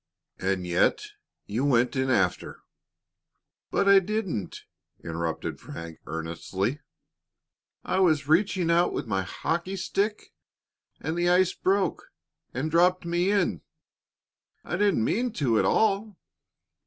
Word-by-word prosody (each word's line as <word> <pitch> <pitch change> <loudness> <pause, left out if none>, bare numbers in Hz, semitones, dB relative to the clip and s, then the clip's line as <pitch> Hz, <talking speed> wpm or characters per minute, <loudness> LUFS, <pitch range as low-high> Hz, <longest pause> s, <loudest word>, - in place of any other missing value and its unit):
"And 95 -1 -1
yet 90 - +2 0.4
you 110 +6 -2
went 125 -3 +2
in 130 0 0
after 95 -8 0 0.5
" - - -58
"But 200 - +1
I 200 0 +8
didn't!" 195 - -3 0.4
interrupted 80 -1 -4
Frank, 85 -1 -9
earnestly. 85 - -3 1.0
"I 190 - 0
was 155 -6 +3
reaching 175 +1 +2
out 170 +1 +3
with - - -3
my 100 -4 -1
hockey 170 - -3
stick, 200 +3 -2 0.7
and 160 - -3
the 175 0 +1
ice 180 0 +4
broke 190 -2 0 0.4
and 145 +6 -3
dropped 180 +2 +3
me 175 +2 +1
in. 185 - +1 1.0
I - - -3
didn't 200 - +2
mean 240 - 0
to 120 - +1
at - - +2
all." 210 -2 +1
170 Hz, 125 wpm, -26 LUFS, -, 1.0 s, I